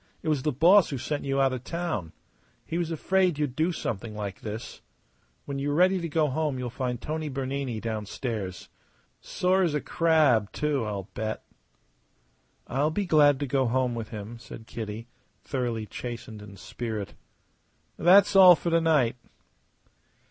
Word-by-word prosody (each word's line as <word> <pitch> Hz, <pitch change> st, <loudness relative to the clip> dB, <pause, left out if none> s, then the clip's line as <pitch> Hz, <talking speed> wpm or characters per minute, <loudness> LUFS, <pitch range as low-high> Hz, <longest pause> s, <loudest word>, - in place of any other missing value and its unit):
It 160 Hz, -, -1 dB
was 150 Hz, -3 st, +1 dB
the 150 Hz, -, 0 dB
boss 175 Hz, +8 st, +5 dB
who 140 Hz, -, -3 dB
sent 145 Hz, +4 st, -3 dB
you 135 Hz, 0 st, 0 dB
out 135 Hz, -1 st, +3 dB
of 125 Hz, -1 st, -5 dB
town. 165 Hz, -, -3 dB, 0.5 s
He 170 Hz, -, -3 dB
was 170 Hz, -2 st, -1 dB
afraid 180 Hz, +1 st, +1 dB
you'd 145 Hz, -4 st, -2 dB
do 160 Hz, +4 st, +1 dB
something 110 Hz, -, -4 dB
like 100 Hz, -2 st, -5 dB
this. 110 Hz, +1 st, -7 dB, 0.6 s
When 140 Hz, -1 st, -4 dB
you 140 Hz, +1 st, -1 dB
are 145 Hz, -, 0 dB
ready 185 Hz, +2 st, +4 dB
to 170 Hz, -, -3 dB
go 155 Hz, 0 st, +2 dB
home 150 Hz, 0 st, -1 dB
you'll 125 Hz, -2 st, -4 dB
find 125 Hz, -1 st, -3 dB
Tony 155 Hz, +2 st, -4 dB
Bernini 135 Hz, -3 st, -3 dB
downstairs. 105 Hz, -3 st, -4 dB, 0.5 s
Sore 185 Hz, +1 st, +1 dB
as 165 Hz, -5 st, +1 dB
a -, -, +1 dB
crab, 150 Hz, -, +2 dB
too, 150 Hz, -4 st, -1 dB
I'll 100 Hz, -3 st, -4 dB
bet." 110 Hz, +1 st, -4 dB, 1.2 s
"I'll 140 Hz, +5 st, 0 dB
be 200 Hz, +5 st, -2 dB
glad 145 Hz, -5 st, +5 dB
to -, -, 0 dB
go 130 Hz, -1 st, +1 dB
home 125 Hz, +1 st, +1 dB
with 115 Hz, -2 st, -5 dB
him," 110 Hz, +1 st, -8 dB
said 115 Hz, 0 st, -11 dB
Kitty, 110 Hz, 0 st, -6 dB, 0.4 s
thoroughly 120 Hz, -5 st, -2 dB
chastened 115 Hz, -2 st, -7 dB
in 100 Hz, -1 st, -12 dB
spirit. 105 Hz, +2 st, -5 dB, 0.8 s
"That's 195 Hz, +3 st, +5 dB
all 185 Hz, -2 st, +10 dB
for 170 Hz, -, -3 dB
to 165 Hz, 0 st, +3 dB
night." 145 Hz, -8 st, +2 dB
135 Hz, 165 wpm, -27 LUFS, 115-160 Hz, 1.2 s, all